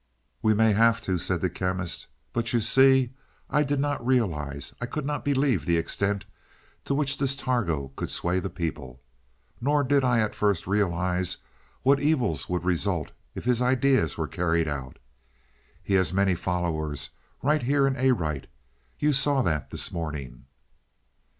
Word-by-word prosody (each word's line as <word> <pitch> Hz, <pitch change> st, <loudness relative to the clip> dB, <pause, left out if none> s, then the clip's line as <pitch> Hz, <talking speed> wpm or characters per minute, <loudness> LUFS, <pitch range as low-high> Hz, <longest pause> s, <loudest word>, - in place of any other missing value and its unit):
"We 110 Hz, -1 st, +3 dB
may 110 Hz, +1 st, +4 dB
have 115 Hz, +2 st, +4 dB
to," 95 Hz, -2 st, -1 dB
said 85 Hz, 0 st, -1 dB
the 90 Hz, -, +1 dB
Chemist. 90 Hz, -1 st, -2 dB, 0.3 s
"But 115 Hz, -1 st, -1 dB
you 120 Hz, -, +3 dB
see, 130 Hz, +2 st, +4 dB, 0.4 s
I 150 Hz, -, +3 dB
did 145 Hz, -1 st, 0 dB
not 145 Hz, -3 st, -1 dB
realize, 80 Hz, -, -1 dB
I 125 Hz, -, -2 dB
could 145 Hz, +3 st, -4 dB
not 145 Hz, 0 st, -2 dB
believe 135 Hz, -, +1 dB
the 85 Hz, -1 st, +3 dB
extent 100 Hz, +4 st, 0 dB, 0.6 s
to 140 Hz, -, 0 dB
which 140 Hz, -1 st, 0 dB
this 135 Hz, -1 st, +1 dB
Targo 100 Hz, -, -1 dB
could -, -, -4 dB
sway 90 Hz, +2 st, 0 dB
the -, -, -4 dB
people. 70 Hz, -7 st, -5 dB, 0.6 s
Nor 145 Hz, +3 st, +2 dB
did 140 Hz, +1 st, +2 dB
I 125 Hz, -2 st, +3 dB
at 110 Hz, -, -1 dB
first 100 Hz, -4 st, 0 dB
realize 90 Hz, -2 st, 0 dB, 0.5 s
what 140 Hz, +1 st, +4 dB
evils 140 Hz, -, 0 dB
would 90 Hz, -1 st, -2 dB
result 85 Hz, -5 st, 0 dB, 0.2 s
if -, -, -6 dB
his 125 Hz, -1 st, +3 dB
ideas 130 Hz, -, +2 dB
were -, -, -2 dB
carried 85 Hz, -2 st, 0 dB
out. 70 Hz, -3 st, -5 dB, 0.9 s
He 100 Hz, -, -2 dB
has 95 Hz, -3 st, +3 dB
many 95 Hz, 0 st, +2 dB
followers 85 Hz, -4 st, -2 dB, 0.3 s
right 150 Hz, +2 st, +2 dB
here 140 Hz, +3 st, +2 dB
in 135 Hz, -1 st, +1 dB
Arite. 95 Hz, -, 0 dB, 0.5 s
You 150 Hz, 0 st, +2 dB
saw 135 Hz, 0 st, +3 dB
that 75 Hz, -, -1 dB
this -, -, -1 dB
morning." 75 Hz, -8 st, -6 dB
105 Hz, 160 wpm, -26 LUFS, 85-130 Hz, 0.9 s, may